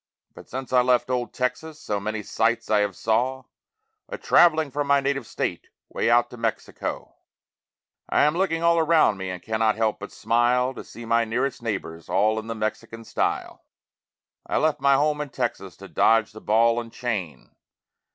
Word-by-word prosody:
But -, -, -14 dB
since 130 Hz, -1 st, -6 dB
I 125 Hz, -, +6 dB
left 125 Hz, 0 st, +2 dB
old 125 Hz, -1 st, -1 dB
Texas 140 Hz, +5 st, -3 dB
so 105 Hz, -7 st, -3 dB
many 110 Hz, +1 st, -4 dB
sights 115 Hz, +2 st, 0 dB
I 105 Hz, -, +4 dB
have 105 Hz, -2 st, 0 dB
saw 125 Hz, +4 st, 0 dB, 0.7 s
A -, -, -5 dB
traveling 160 Hz, -4 st, +4 dB
from 145 Hz, +1 st, -2 dB
my 140 Hz, 0 st, +4 dB
native 135 Hz, -2 st, -2 dB
state -, -, -3 dB, 0.2 s
way -, -, -1 dB
out 120 Hz, +1 st, +3 dB
to 125 Hz, -, -10 dB
Mexico, 115 Hz, -1 st, -4 dB, 0.9 s
I -, -, +3 dB
am 150 Hz, +1 st, +3 dB
looking 170 Hz, -3 st, 0 dB
all 170 Hz, 0 st, +4 dB
around 160 Hz, -10 st, +3 dB
me 95 Hz, -1 st, -5 dB
and 90 Hz, -1 st, -6 dB
cannot 110 Hz, -1 st, +1 dB
help 110 Hz, -1 st, 0 dB
but -, -, -8 dB
smile 120 Hz, +3 st, +1 dB
To -, -, -8 dB
see 120 Hz, -, -11 dB
my 115 Hz, +1 st, +2 dB
nearest 120 Hz, +4 st, -2 dB
neighbors 95 Hz, -7 st, -5 dB
all 110 Hz, +3 st, +2 dB
in 110 Hz, -, -9 dB
the 115 Hz, -, -4 dB
Mexican 110 Hz, +1 st, -4 dB
style. -, -, -2 dB, 0.8 s
I -, -, 0 dB
left 155 Hz, -3 st, +1 dB
my 140 Hz, 0 st, +5 dB
home 150 Hz, +1 st, +1 dB
in 150 Hz, -, -5 dB
Texas 120 Hz, -7 st, -4 dB
to 95 Hz, -, -11 dB
dodge 110 Hz, +1 st, +3 dB
the 110 Hz, 0 st, -12 dB
ball 115 Hz, +2 st, +3 dB
and 115 Hz, -1 st, -11 dB
chain. 105 Hz, -12 st, -4 dB
120 Hz, 180 wpm, -24 LUFS, 110-135 Hz, 0.9 s, I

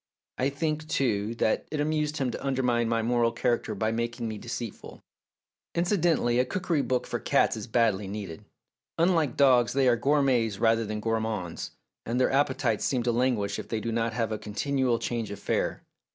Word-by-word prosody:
I 130 Hz, -, +2 dB
think, 155 Hz, +2 st, -2 dB
too, 115 Hz, -6 st, 0 dB
that 110 Hz, -, 0 dB
it 155 Hz, -, -3 dB
amused 150 Hz, 0 st, 0 dB
him 130 Hz, -3 st, 0 dB
to -, -, -6 dB
undermine 125 Hz, -4 st, +1 dB
my 115 Hz, -1 st, +1 dB
moral 120 Hz, 0 st, +2 dB
character 120 Hz, -2 st, -1 dB
by 110 Hz, +3 st, 0 dB
making 115 Hz, +1 st, -2 dB
me 110 Hz, -1 st, -5 dB
deceitful. 115 Hz, -1 st, -7 dB, 0.7 s
Incidentally, 170 Hz, -, +2 dB
a -, -, +5 dB
cookery 175 Hz, 0 st, -1 dB
book 130 Hz, -2 st, -1 dB
for -, -, -3 dB
cats -, -, +2 dB
is 110 Hz, -2 st, -6 dB
badly 110 Hz, -4 st, +1 dB
needed. 95 Hz, -5 st, -6 dB, 0.5 s
Unlike 165 Hz, -6 st, +2 dB
dogs, 125 Hz, -4 st, +5 dB
they 135 Hz, -1 st, +3 dB
are 120 Hz, -, +5 dB
gourmets 125 Hz, -5 st, +2 dB
rather 115 Hz, +1 st, +2 dB
than 105 Hz, 0 st, -3 dB
gourmands, 110 Hz, -6 st, -2 dB, 0.3 s
and 120 Hz, +2 st, -2 dB
their 130 Hz, -, +3 dB
appetites 135 Hz, -5 st, +1 dB
seem 125 Hz, -3 st, 0 dB
to 120 Hz, -, +1 dB
languish 115 Hz, -5 st, 0 dB
if -, -, -7 dB
they 110 Hz, -, -1 dB
do 115 Hz, +2 st, -3 dB
not 115 Hz, 0 st, 0 dB
have 115 Hz, -1 st, -1 dB
a 110 Hz, -, -2 dB
con 105 Hz, -1 st, -9 dB
tinual 130 Hz, -4 st, +1 dB
change 115 Hz, -3 st, -3 dB
of 100 Hz, -, -6 dB
fare. -, -, -1 dB
120 Hz, 185 wpm, -27 LUFS, 110-135 Hz, 0.7 s, a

